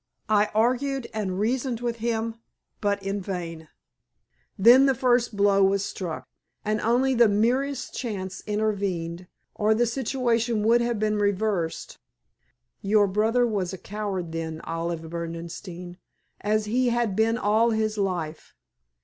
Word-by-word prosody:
I 210 -1 +3
argued 255 +3 +1
and 195 -4 -2
reasoned 240 +2 0
with 235 -1 -2
him, 230 0 -2 0.4
but 200 -1 0
in 195 +1 -2
vain. 170 -4 -5 0.9
Then 245 +7 +7
the 270 - +3
first 240 -3 +1
blow 200 -1 +4
was 195 +1 +2
struck, 175 -4 -5 0.4
and 215 0 0
only 250 +4 +2
the 235 -2 +5
merest 255 +6 0
chance 190 -6 -4
intervened, 195 -5 -2 0.3
or 215 +1 +2
the 240 +2 +3
situation 235 -2 0
would 235 +2 +4
have 235 -1 0
been 215 0 0
reversed. 200 -4 -1 0.8
Your 205 +1 +4
brother 220 +5 +2
was 195 -5 -1
a - - -5
coward 195 -3 -4
then, 160 -1 -4
Olive 165 0 -4
Berdenstein, 170 +2 -7 0.4
as 215 +1 0
he 245 +4 +1
had 235 -4 0
been 225 +2 +2
all 220 +1 +3
his 220 -1 0
life. 175 -5 -3
210 Hz, 135 wpm, -25 LUFS, 190-235 Hz, 0.9 s, Then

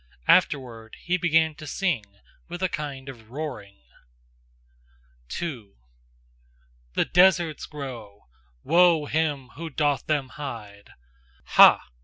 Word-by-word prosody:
Afterward 115 -5 +1
he 180 - 0
began 165 -3 +2
to 155 0 -11
sing 160 - -1 0.5
with 175 +2 -6
a 185 - +1
kind 140 -3 -6
of 115 -5 -11
roaring. 120 - -7 1.5
2. 120 - -6 1.2
THE - - +2
DESERTS 175 -3 +3
GROW: 120 -9 -9 0.4
WOE 170 -1 +4
HIM 145 -4 -1
WHO 165 +5 -8
DOTH 145 -1 -1
THEM 145 -4 -1
HIDE! 115 -8 -9 0.5
Ha! - - +7
145 Hz, 105 wpm, -25 LUFS, 120-160 Hz, 1.5 s, Ha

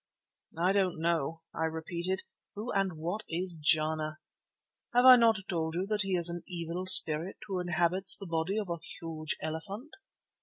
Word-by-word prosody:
"I 180 +3 +1
don't 190 -5 0
know," 165 -1 -2
I 160 - -2
repeated. 170 +3 -4 0.3
"Who 215 +4 -5
and 195 -2 -1
what 175 +7 -4
is 175 +1 +1
Jana?" 155 0 0 0.8
"Have 245 +1 +4
I 255 -1 +10
not 225 -4 +3
told 160 -2 -3
you 180 +2 -2
that 210 0 -2
he 195 -1 -1
is 170 -1 +3
an 175 0 -3
evil 175 +1 -5
spirit 170 -1 +7
who 195 -3 -4
inhabits 175 +2 +2
the 200 - -9
body 170 +3 -2
of 205 -5 -3
a 170 - -4 0.2
huge 155 -2 -5
elephant?" 195 - -6
175 Hz, 165 wpm, -29 LUFS, 160-195 Hz, 0.8 s, I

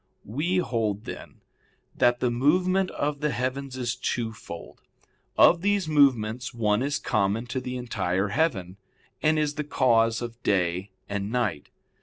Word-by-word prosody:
We 155 - -1
hold, 110 - -1
then, - - -9 0.5
that 120 0 +3
the 125 - +2
movement 180 +9 +2
of 145 0 -2
the 150 - +1
heavens 130 0 -3
is 120 -1 -2
twofold. 110 -9 -5 0.6
Of 170 - +6
these 200 -2 +1
movements, 130 -5 +2
one 105 -1 +1
is 140 +2 0
common 110 0 0
to 130 +1 -3
the 125 0 -4
entire 100 -5 -1
heaven, 100 - -1 0.4
and 155 0 +3
is 150 -1 +1
the 150 - -3
cause 115 -5 +2
of 120 0 -7
day 95 -2 0 0.2
and 100 +1 -3
night. 115 -11 -1
125 Hz, 145 wpm, -26 LUFS, 110-145 Hz, 0.6 s, Of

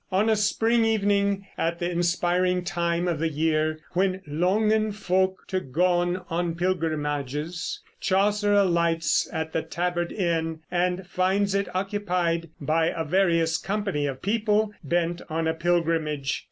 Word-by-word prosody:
On 200 +4 +2
a - - +4
spring 225 +2 +2
evening, 200 -2 +1
at 170 +1 0
the 175 - -2
inspiring 175 +1 +1
time 170 -1 -1
of 170 -4 -1
the 165 +1 +1
year 155 0 0
when 190 +1 0
"longen 210 +8 +1
folk 190 -2 0
to 185 - 0
goon 175 +4 +1
on 170 0 -1
pilgrimages," 155 -3 -2 0.2
Chaucer 205 +2 +2
alights 170 -5 +2
at 160 -1 -3
the 160 - +1
Tabard 175 0 -2
Inn, 165 -4 -1
and 180 +1 0
finds 190 +2 +1
it 200 0 0
occupied 180 -4 -1
by 160 +3 +1
a 165 -1 -2
various 165 -1 +2
company 195 -8 -1
of 135 -2 -6
people 210 0 +1
bent 170 +3 0
on 160 +1 -1
a 160 - +1
pilgrimage. 165 -4 0
175 Hz, 140 wpm, -25 LUFS, 165-195 Hz, 0.2 s, a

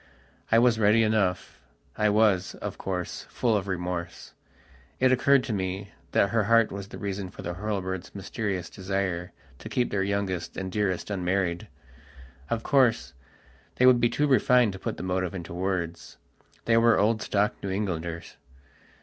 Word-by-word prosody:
I 115 - +6
was 120 -1 +4
ready 110 +2 +4
enough. 100 -9 0 0.3
I 105 0 +2
was, 105 -3 +2
of - - -6
course, 90 -2 -4
full 115 -3 +1
of 100 -1 -1
remorse. 90 -2 -4 0.7
It 130 0 +4
occurred 135 +1 +4
to 115 - -3
me 95 +1 -3 0.2
that 100 - +2
her 115 -3 +2
heart 115 0 +4
was 100 0 -6
the - - -9
reason 100 -2 -4
for - - -11
the 85 - -3
Hurlbirds' 95 -2 -4
mysterious 100 -2 -3
desire 95 -1 -3 0.3
to - - -8
keep 125 - 0
their 100 - 0
youngest 100 -3 -2
and 95 -1 -4
dearest 105 -1 -1
unmarried. 90 -2 -1 0.8
Of 115 -1 -1
course, 130 -6 +2 0.6
they 125 - +3
would 130 -1 +7
be 120 - +4
too 145 - +1
refined 125 -5 +4
to 95 - -8
put - - -4
the - - -6
motive 90 0 -1
into 85 -2 -7
words. 90 -2 -3 0.5
They 115 -1 +4
were 115 0 +5
old 110 +2 +2
stock 105 0 +1
New 100 - -4
Englanders. 85 -4 -4
100 Hz, 165 wpm, -27 LUFS, 95-110 Hz, 0.8 s, would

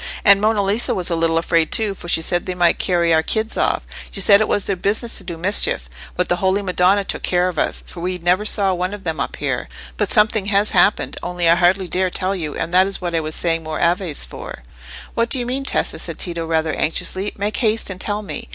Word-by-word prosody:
And 200 -1 +6
Monna 215 -1 +2
Lisa 205 +4 0
was 180 -1 -2
a - - +1
little 165 0 +1
afraid 165 -1 +1
too, 215 -3 +1
for 175 - -11
she 165 -1 +2
said 175 +1 -1
they 185 - -3
might 175 -1 +2
carry 170 -3 +2
our 160 - +4
kids 220 +7 0
off; - - 0 0.2
she - - -5
said 200 +2 +6
it 215 - +1
was 205 - +1
their 195 - 0
business 215 +5 -1
to - - -8
do 175 -2 -6
mischief. 170 - +2 0.3
But 180 - 0
the 175 - 0
Holy 190 +2 0
Madonna 185 +1 +2
took - - -4
care 180 0 +1
of 175 -4 -3
us, - - -2
for 175 - -11
we 180 +1 -3
never 180 +3 +1
saw 200 -2 +1
one 180 +3 -2
of 200 - -13
them 160 -4 -3
up - - -3
here. - - -3 0.3
But - - -1
something 210 -1 +3
has 205 0 +2
happened, 210 - +2
only 175 -1 -2
I 165 - +7
hardly 180 +2 +2
dare 185 +1 0
tell 185 +2 -1
you, 155 -5 -5
and 165 - -4
that 185 +1 +5
is 195 - 0
what 175 -2 -4
I 165 - +2
was 155 0 -4
saying 165 -1 0
more 155 -1 -5
Aves 175 -2 0
for." - - -9 0.5
"What 230 0 0
do 265 - +4
you 245 - -2
mean, 260 +3 -3
Tessa?" - - -1
said - - -5
Tito, 170 -2 -3
rather 160 -1 0
anxiously. 185 +5 -2
"Make 205 +1 -2
haste 220 -3 +1
and 185 0 -8
tell 210 0 -2
me." 230 +3 -7
185 Hz, 250 wpm, -19 LUFS, 170-205 Hz, 0.5 s, I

